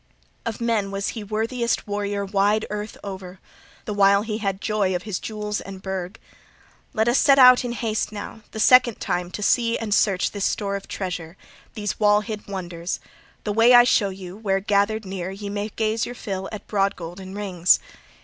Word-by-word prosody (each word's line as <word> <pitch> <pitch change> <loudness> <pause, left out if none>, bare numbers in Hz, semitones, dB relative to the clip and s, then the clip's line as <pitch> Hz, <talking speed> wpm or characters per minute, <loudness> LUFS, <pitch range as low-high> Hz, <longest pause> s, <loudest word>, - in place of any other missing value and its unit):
Of 225 - -3
men 225 -4 0
was 195 0 -2
he 220 - -5
worthiest 225 +3 -1
warrior 205 0 -2
wide 205 +2 +2
earth 210 0 -5
o'er 190 -2 -8 0.5
the 210 - -3
while 200 0 +4
he 215 -1 -3
had 195 -3 -2
joy 205 -3 0
of 180 - -3
his 210 -4 -3
jewels 210 -1 -4
and 195 -1 -9
burg. 190 0 -4 0.7
Let 220 0 +1
us 240 +2 +4
set 280 -4 +5
out 250 -1 +8
in 240 -1 -3
haste 220 -3 -2
now, 215 +1 -7
the 220 - -7
second 245 0 +5
time 180 0 -2
to 205 +3 -5
see 230 +2 +2
and 220 -2 -2
search 195 -3 +2
this 205 -2 -2
store 200 -2 -1
of 195 - -6
treasure, 180 -2 -5 0.4
these 205 -2 -3
wall 210 -1 +4
hid 215 -1 -7
wonders, 175 -3 -4 0.4
the 210 - -2
way 230 +3 +6
I 240 - +9
show 230 -5 +3
you, 185 -1 -8
where, 200 -2 0
gathered 205 +2 +1
near, 185 -1 -4
ye 200 +1 -6
may 205 +1 -3
gaze 220 +1 -1
your 245 - -7
fill 195 -4 -5
at 215 -2 -7
broad 200 -1 +1
gold 175 +2 -8
and 190 +1 -8
rings. 185 -4 +3
205 Hz, 195 wpm, -23 LUFS, 195-220 Hz, 0.7 s, I